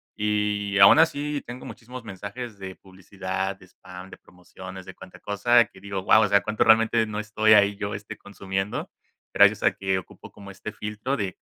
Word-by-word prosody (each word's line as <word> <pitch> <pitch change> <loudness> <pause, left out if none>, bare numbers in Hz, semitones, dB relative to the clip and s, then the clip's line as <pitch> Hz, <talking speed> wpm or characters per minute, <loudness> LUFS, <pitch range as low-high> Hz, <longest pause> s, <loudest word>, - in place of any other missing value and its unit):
y 105 -1 -1
aun 100 +10 +8
así 150 -2 +1
tengo 120 +1 -9
muchísimos 125 +1 -10
mensajes 100 +3 -8
de 95 -1 -8
publicidad, 95 0 -5
de 95 - -17
spam, 90 +1 -13
de - - -12
promociones, 95 +1 -12
de 95 - -11
cuanta 95 -1 -14
cosa, 120 +4 +3
que 95 - -19
digo: 100 -1 -5
"Guau". 110 +3 +5
O - - +2
sea, 100 0 +3
cuánto 110 0 0
realmente 115 0 +4
no 105 -1 -5
estoy 110 +1 +1
ahí 100 -1 +4
yo, 100 0 -4
este, 105 +1 -9
consumiendo. 95 0 -5 0.4
Gracias - - +5
a - - +4
que 95 -1 -2
ocupo - - -14
como 100 -1 -12
este 100 +2 -8
filtro 105 +7 -4
de 100 -5 -4
100 Hz, 190 wpm, -24 LUFS, 95-110 Hz, 0.4 s, aun